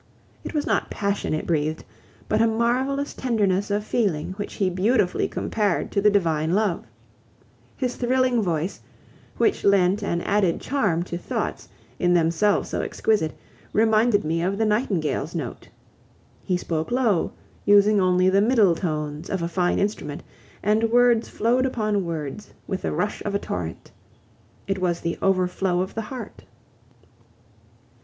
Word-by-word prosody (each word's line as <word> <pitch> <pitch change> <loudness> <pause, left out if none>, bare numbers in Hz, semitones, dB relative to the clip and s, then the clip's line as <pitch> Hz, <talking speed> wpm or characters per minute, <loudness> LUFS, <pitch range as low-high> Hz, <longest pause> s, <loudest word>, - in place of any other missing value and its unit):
It - - -7
was 295 - 0
not 220 - 0
passion 200 0 -2
it 155 - -4
breathed, 155 -1 -1 0.4
but 215 - +2
a 230 - +5
marvelous 255 +5 0
tenderness 205 -6 0
of 205 +1 0
feeling 190 -10 0
which 205 +2 -6
he 195 - +1
beautifully 185 +2 +1
compared 205 -5 -1
to 200 - +1
the 210 - +5
divine 165 -4 +1
love. 205 -5 0 0.9
His 250 -2 -2
thrilling 255 -1 +2
voice, 170 -1 -2 0.6
which 420 - +1
lent 200 0 +3
an 170 -4 -1
added 200 -4 +1
charm 200 -12 0
to 175 -1 -5
thoughts, - - -4 0.3
in 175 0 +3
themselves 170 +5 +2
so - - -2
exquisite, 205 -8 0 0.4
reminded 220 0 +3
me 165 +2 0
of 190 +3 -1
the 220 - +1
nightingale's 175 - 0
note. 140 -8 -5 0.7
He 180 - 0
spoke 160 -2 -3
low, 240 -8 +1 0.3
using 205 0 +5
only 185 0 +3
the 195 +1 +4
middle 215 -5 +4
tones 155 -2 -3
of 190 -3 -2
a - - 0
fine 175 +1 0
instrument, 175 -8 -2 0.4
and 215 +3 +2
words 240 -1 +4
flowed 250 +4 +1
upon 215 -6 -1
words 160 +3 -6
with 190 - -3
the - - -2
rush 205 - -2
of 205 -1 -2
a - - +1
torrent. 85 - -5 0.7
It 195 -1 -2
was 175 -2 0
the 170 0 -3
overflow 185 -1 +1
of 190 - -4
the 225 - -3
heart. 255 - -8
200 Hz, 150 wpm, -24 LUFS, 170-220 Hz, 0.9 s, a